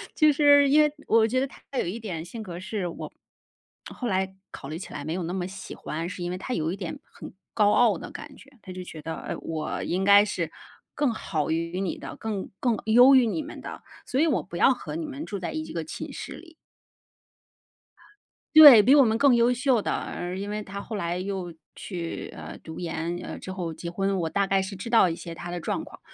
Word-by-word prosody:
就 305 Hz, -1 st, +5 dB
是 285 Hz, -1 st, +5 dB
因 300 Hz, +2 st, +6 dB
为 300 Hz, -1 st, +3 dB, 0.2 s
我 225 Hz, 0 st, +4 dB
觉 255 Hz, +3 st, +1 dB
得 270 Hz, -, 0 dB
她 -, -, -17 dB, 0.2 s
有 -, -, +1 dB
一 185 Hz, +7 st, -4 dB
点 180 Hz, -8 st, -5 dB
性 205 Hz, +7 st, -8 dB
格 175 Hz, -5 st, -7 dB
是 190 Hz, 0 st, -3 dB
我 170 Hz, -, -7 dB, 0.8 s
后 245 Hz, -, -5 dB
来 190 Hz, -2 st, -1 dB, 0.2 s
考 -, -, -9 dB
虑 155 Hz, -, -4 dB
起 180 Hz, -, -9 dB
来 145 Hz, -, -5 dB
没 155 Hz, +2 st, -3 dB
有 180 Hz, +1 st, -3 dB
那 170 Hz, +2 st, -4 dB
么 180 Hz, -1 st, -2 dB
喜 190 Hz, +1 st, -9 dB
欢， 165 Hz, +2 st, -5 dB
是 180 Hz, 0 st, -6 dB
因 175 Hz, -, -3 dB
为 180 Hz, -, -3 dB
她 250 Hz, +7 st, -5 dB
有 160 Hz, -4 st, -1 dB
一 -, -, -3 dB
点 180 Hz, -4 st, -5 dB
很 -, -, -12 dB, 0.2 s
高 210 Hz, -2 st, +4 dB
傲 225 Hz, -6 st, +4 dB
的 -, -, -8 dB
感 280 Hz, -, -10 dB
觉。 275 Hz, -, -17 dB
她 190 Hz, -, -10 dB
就 185 Hz, 0 st, -6 dB
觉 160 Hz, -3 st, -9 dB
得， 160 Hz, +2 st, -5 dB
呃， -, -, -5 dB
我 155 Hz, -1 st, -4 dB
应 185 Hz, +2 st, -1 dB
该 200 Hz, 0 st, +8 dB
是 180 Hz, -6 st, -3 dB, 0.4 s
更 280 Hz, -5 st, +1 dB
好 160 Hz, -8 st, -2 dB
于 170 Hz, +2 st, -2 dB
你 190 Hz, -, -2 dB
的， -, -, -8 dB
更 215 Hz, -3 st, -4 dB
更 240 Hz, -4 st, +1 dB
优 245 Hz, +5 st, +7 dB
于 255 Hz, -2 st, +6 dB
你 305 Hz, +8 st, -2 dB
们 305 Hz, -, -9 dB
的， -, -, -8 dB, 0.2 s
所 260 Hz, -, -1 dB
以 -, -, +5 dB
我 290 Hz, -, +1 dB
不 175 Hz, -, -11 dB
要 -, -, +5 dB
和 255 Hz, -, -7 dB
你 325 Hz, 0 st, -3 dB
们 290 Hz, +1 st, -6 dB
住 205 Hz, -, -5 dB
在 180 Hz, -, -4 dB
一 315 Hz, 0 st, -3 dB
个 165 Hz, -, -3 dB
寝 160 Hz, -, -7 dB
室 -, -, -7 dB
里。 330 Hz, -1 st, -13 dB, 2.0 s
对， 290 Hz, -8 st, +12 dB
比 255 Hz, +7 st, +6 dB
我 285 Hz, -, +8 dB
们 220 Hz, -2 st, +2 dB
更 270 Hz, 0 st, +5 dB
优 235 Hz, +1 st, +4 dB
秀 250 Hz, -2 st, +2 dB
的。 -, -, -2 dB
呃， 175 Hz, +1 st, -4 dB
因 200 Hz, +2 st, -5 dB
为 210 Hz, 0 st, -3 dB
她 200 Hz, 0 st, -7 dB
后 220 Hz, -, -6 dB
来 175 Hz, -3 st, -2 dB
又 185 Hz, -2 st, -4 dB, 0.2 s
去， 170 Hz, -4 st, -6 dB
呃， -, -, -8 dB
读 160 Hz, -, -9 dB
研， 170 Hz, 0 st, -3 dB
呃， -, -, -6 dB
之 185 Hz, -, -8 dB
后 175 Hz, -3 st, -4 dB
结 170 Hz, +2 st, -6 dB
婚， 195 Hz, +2 st, 0 dB
我 165 Hz, -2 st, -1 dB
大 200 Hz, +3 st, 0 dB
概 195 Hz, 0 st, +2 dB
是 190 Hz, +1 st, -5 dB
知 195 Hz, +5 st, -7 dB
道 225 Hz, -6 st, +5 dB
一 165 Hz, -, -3 dB
些 170 Hz, 0 st, -8 dB
她 175 Hz, +1 st, -7 dB
的 175 Hz, -, -3 dB
状 -, -, -3 dB
况。 -, -, -13 dB
195 Hz, 255 characters per minute, -26 LUFS, 175-245 Hz, 2.0 s, 对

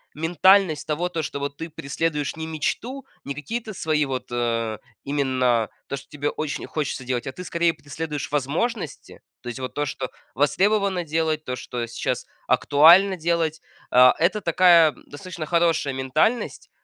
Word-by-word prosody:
ментальность 170 Hz, 0 st, +3 dB
того, 170 Hz, +4 st, -1 dB
то 165 Hz, -2 st, -2 dB
что 140 Hz, -, -4 dB
вот 140 Hz, 0 st, -4 dB
ты 165 Hz, +1 st, -6 dB
преследуешь 150 Hz, 0 st, -2 dB
не 160 Hz, 0 st, -5 dB
мечту, 230 Hz, -, -3 dB, 0.2 s
не 140 Hz, -, -3 dB
какие-то 220 Hz, +9 st, -5 dB
свои 155 Hz, -4 st, 0 dB
вот, 130 Hz, -1 st, -4 dB
э, 115 Hz, -2 st, -1 dB, 0.3 s
именно 130 Hz, -5 st, +1 dB, 0.2 s
то, -, -, -3 dB
что 135 Hz, -, -12 dB
тебе 145 Hz, 0 st, -2 dB
очень 155 Hz, -2 st, -4 dB
хочется 145 Hz, -4 st, -3 dB
делать, 125 Hz, -1 st, -2 dB
а 135 Hz, -, -3 dB
ты, 180 Hz, -, -9 dB
скорее, 170 Hz, -1 st, +1 dB
преследуешь 145 Hz, -1 st, -6 dB
возможности. 160 Hz, -, -2 dB, 0.2 s
То 120 Hz, -, -7 dB
есть, 120 Hz, -, -6 dB
вот 130 Hz, -1 st, -5 dB
то, 145 Hz, 0 st, 0 dB
что 130 Hz, -1 st, -4 dB, 0.3 s
востребовано 195 Hz, +5 st, +2 dB
делать, 155 Hz, 0 st, -1 dB
то, 125 Hz, -3 st, -4 dB
что 120 Hz, -1 st, -5 dB
сейчас 120 Hz, -, -3 dB, 0.2 s
актуально 175 Hz, +7 st, +6 dB
делать, 160 Hz, -1 st, 0 dB, 0.3 s
а, 125 Hz, 0 st, +7 dB
это 195 Hz, +5 st, +2 dB
такая 170 Hz, -2 st, +5 dB, 0.2 s
достаточно 165 Hz, +2 st, -7 dB
хорошая 165 Hz, -5 st, +2 dB
ментальность, 145 Hz, -, 0 dB
155 Hz, 155 wpm, -23 LUFS, 135-170 Hz, 0.3 s, а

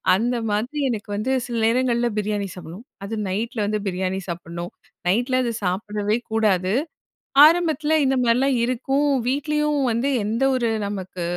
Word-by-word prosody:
அந்த 240 Hz, +5 st, 0 dB, 0.2 s
மாதிரி 240 Hz, +8 st, -2 dB
எனக்கு 210 Hz, -3 st, -4 dB
வந்து 215 Hz, +6 st, -1 dB
சில 240 Hz, -2 st, -4 dB
நேரங்கள்ல 240 Hz, 0 st, +2 dB
பிரியாணி 210 Hz, -1 st, -1 dB
சாப்புட்ணும். 180 Hz, +6 st, -10 dB, 0.2 s
அது 220 Hz, +3 st, -4 dB
நைட்டில 220 Hz, +3 st, -2 dB
வந்து 210 Hz, +1 st, -1 dB
பிரியாணி 185 Hz, +1 st, -2 dB
சாப்புட்ணும், 170 Hz, 0 st, -6 dB, 0.4 s
நைட்டில 245 Hz, +7 st, +2 dB
அத 235 Hz, -, -1 dB
சாப்பிடவே 205 Hz, +3 st, -1 dB
கூடாது! 195 Hz, -4 st, +2 dB, 0.7 s
ஆரம்பத்தில 315 Hz, -2 st, +3 dB
இந்த 265 Hz, -, +2 dB
மாதிரிலாம் 250 Hz, +3 st, +3 dB
இருக்கும். 270 Hz, +4 st, 0 dB, 0.2 s
வீட்லயும் 300 Hz, +2 st, 0 dB
வந்து 235 Hz, +4 st, 0 dB, 0.2 s
எந்த 225 Hz, +5 st, -1 dB
ஒரு 235 Hz, -2 st, 0 dB, 0.2 s
நமக்கு 190 Hz, -3 st, -5 dB
225 Hz, 135 wpm, -22 LUFS, 200-255 Hz, 0.7 s, ஆரம்பத்தில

